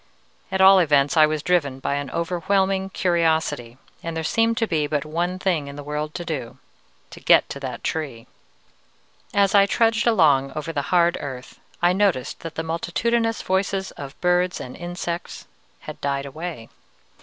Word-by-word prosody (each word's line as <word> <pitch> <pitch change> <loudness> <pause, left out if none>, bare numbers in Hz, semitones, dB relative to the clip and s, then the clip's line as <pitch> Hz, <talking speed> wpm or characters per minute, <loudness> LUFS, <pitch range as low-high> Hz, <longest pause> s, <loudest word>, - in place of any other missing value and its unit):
At 190 0 0
all 190 0 +8
events, 145 -4 +3
I 155 -1 +6
was 155 -1 -3
driven 145 -7 +1
by 135 - -2
an 145 -1 -3
overwhelming 190 +4 0
curiosity, 160 -9 0 0.2
and 165 -1 -5
there 160 - -2
seemed 230 +6 +1
to 225 - +2
be 155 -7 0
but 150 0 -1
one 175 +4 -2
thing 175 -6 -1
in 140 - -8
the 145 - -8
world 150 +1 -4
to 175 - -5
do, 135 -8 -5 0.5
to - - -10
get - - +5
to - - -6
that - - -6
Tree! 140 -8 -3 1.1
As 200 -1 +2
I 200 -1 +6
trudged 225 +2 +2
along 145 - +3
over 155 +2 -4
the 145 - 0
hard 175 -1 +3
earth, 130 -3 -8 0.2
I 175 +1 +5
noticed 190 -10 0
that 165 -1 -8
the 160 - -3
multitudinous 225 +8 -1
voices 190 0 -1
of 140 0 -10
birds 180 0 +1
and 125 - -8
insects 175 -1 -5 0.4
had - - -9
died 140 0 -1
away. 150 -4 -7
165 Hz, 170 wpm, -23 LUFS, 145-190 Hz, 1.1 s, all